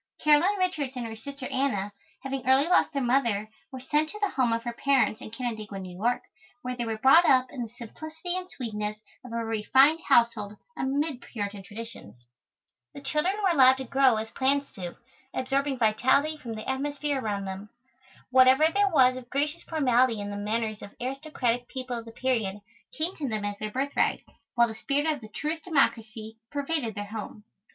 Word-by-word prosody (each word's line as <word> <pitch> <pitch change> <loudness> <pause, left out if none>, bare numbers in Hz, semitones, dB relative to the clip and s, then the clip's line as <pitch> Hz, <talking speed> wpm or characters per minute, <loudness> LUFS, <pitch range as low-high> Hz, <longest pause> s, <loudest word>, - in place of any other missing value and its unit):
Caroline 305 +7 +4
Richards 320 -8 -1
and 245 -2 -4
her 225 -1 -6
sister 275 +4 -8
Anna, 205 -7 0 0.3
having 270 -1 -3
early 270 +4 +5
lost 360 - +4
their 275 -3 -1
mother, 235 -5 +1 0.2
were 260 - -7
sent 300 +4 0
to 420 - -8
the 410 -2 0
home 255 -3 +2
of 230 0 0
her 240 0 -3
parents 265 -3 +2
in - - -7
Canandaigua, 220 -3 -5
New 185 -2 -7
York, 235 +6 0 0.4
where 250 0 -3
they 240 -1 -3
were 225 -1 -2
brought 270 +9 +7
up 255 -1 +4
in 260 - -6
the 230 - -4
simplicity 315 +9 -7
and 370 0 -5
sweetness 215 -7 -4 0.3
of 250 - -10
a 230 0 -2
refined 260 +8 +4
household, 210 -3 +3 0.2
amid 280 -1 -1
Puritan 205 -4 -5
traditions. 200 - -10 0.7
The 280 - -8
children 300 +7 0
were 380 - +4
allowed 265 -4 +6
to 265 - -4
grow 265 -1 +4
as 220 +1 -4
plants 275 +1 0
do, 175 -3 -7 0.4
absorbing 270 +1 0
vitality 260 +7 +3
from 245 -7 -7
the 215 0 -7
atmosphere 285 +1 -1
around 205 -3 -2
them. 190 +2 -6 0.6
Whatever 260 +4 +6
there 405 0 +3
was 255 -6 +5
of 250 -1 -10
gracious 295 +4 -1
formality 255 -7 +2
in 205 0 -4
the - - -4
manners 215 +1 -2
of 200 - -10
aristocratic 250 -2 -2
people 255 -2 -4
of 230 - -10
the 230 - -10
period, 225 -6 -1 0.3
came 330 +4 -2
to 285 -4 -3
them 215 -2 -2
as 205 0 -4
their 215 - -3
birthright, 270 +5 0 0.3
while 235 -1 +5
the 225 - -6
spirit 280 +6 -1
of 305 -4 0
the 215 - -10
truest 305 +8 -3
democracy 225 -8 0
pervaded 285 -6 -2
their 205 0 -4
home. 210 0 -7
255 Hz, 190 wpm, -27 LUFS, 220-280 Hz, 0.7 s, brought